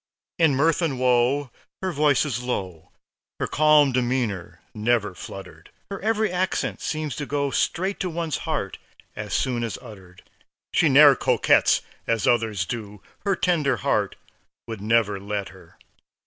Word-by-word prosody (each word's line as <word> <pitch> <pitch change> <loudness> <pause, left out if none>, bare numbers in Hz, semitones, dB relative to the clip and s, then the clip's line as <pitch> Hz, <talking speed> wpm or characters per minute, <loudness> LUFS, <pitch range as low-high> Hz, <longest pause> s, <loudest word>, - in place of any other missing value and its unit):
In 160 -5 +4
mirth 160 +5 +2
and 145 -7 -1
woe 125 +2 +2 0.3
her 185 - 0
voice 150 -2 +2
is 125 -5 -3
low, 95 -10 -5 0.5
Her - - 0
calm 150 -2 +4
demeanor 120 -7 -2
never 110 -2 0
fluttered; - - -10 0.2
Her 195 - -5
every 220 -1 +1
accent 180 +1 -1
seems 155 -2 -3
to 145 -2 -4
go 140 -1 -1
Straight 190 +8 -1
to 185 - -2
one's 165 -2 -3
heart 120 -11 -3 0.4
as 105 0 -6
soon 125 -3 0
as 115 - -3
uttered. 95 -6 -14 0.5
She 160 - +4
ne'er 140 0 +8
coquets - - +3 0.3
as 115 -3 0
others 110 -6 +1
do; 105 -2 -7 0.2
Her 200 -1 +2
tender 155 -9 +1
heart - - +1 0.5
would 110 -3 -6
never 105 -2 +1
let 100 0 -4
her. - - -17
130 Hz, 150 wpm, -24 LUFS, 105-155 Hz, 0.5 s, ne'er